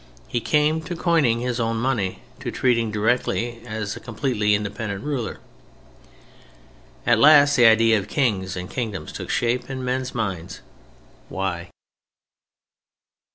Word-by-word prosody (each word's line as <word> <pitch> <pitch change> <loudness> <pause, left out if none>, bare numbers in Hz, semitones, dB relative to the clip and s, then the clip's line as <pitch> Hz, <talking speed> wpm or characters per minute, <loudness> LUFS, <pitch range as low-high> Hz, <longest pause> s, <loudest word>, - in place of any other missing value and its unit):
He 120 - -2
came 150 +6 +2
to 175 +2 -4
coining 155 -10 +2
his 125 -1 -2
own 115 0 0
money, 115 -5 -1 0.2
to 125 -1 -4
treating 115 -2 +1
directly 115 +2 -1
as 110 -2 -4
a - - -8
completely 115 -3 0
independent 100 0 -4
ruler. 140 -6 -3 1.7
At 120 -2 +4
last 145 +1 +7
the 120 -2 +6
idea 115 0 +5
of 100 - -7
"kings" 100 -9 -1
and 90 0 -5
"kingdoms" 110 -5 -4
took - - -7
shape 120 +3 0
in 130 -1 -4
men's 125 0 -2
minds. 95 -4 -4 0.7
Why? 90 -3 -3
115 Hz, 130 wpm, -23 LUFS, 105-130 Hz, 1.7 s, last